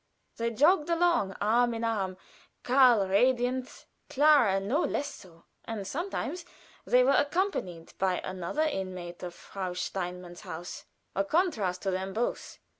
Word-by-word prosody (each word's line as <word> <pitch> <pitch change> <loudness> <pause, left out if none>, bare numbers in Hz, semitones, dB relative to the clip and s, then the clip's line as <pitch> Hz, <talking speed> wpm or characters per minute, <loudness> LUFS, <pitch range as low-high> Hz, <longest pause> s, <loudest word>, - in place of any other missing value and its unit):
They 230 0 0
jogged 300 - +3
along 335 - +2
arm 235 +3 +2
in 225 - -4
arm, 195 -5 -1 0.5
Karl 245 -6 +5
radiant, 250 +5 +1 0.2
Clara 280 -9 +5
no 205 +9 0
less 285 +1 -2
so, 170 -3 -15 0.2
and 220 -3 -5
sometimes 345 - -4 0.4
they 250 0 +5
were 265 - +4
accompanied 285 - -1
by 185 -1 +1
another 185 - -2
inmate 185 - -4
of 175 -1 -6
Frau 185 -2 -6
Steinmann's 180 -1 -5
house 175 -2 -8 0.3
a 195 - +2
contrast 210 - 0
to 195 - 0
them 190 +1 -3
both. 235 +4 -3
215 Hz, 135 wpm, -29 LUFS, 185-270 Hz, 0.5 s, Karl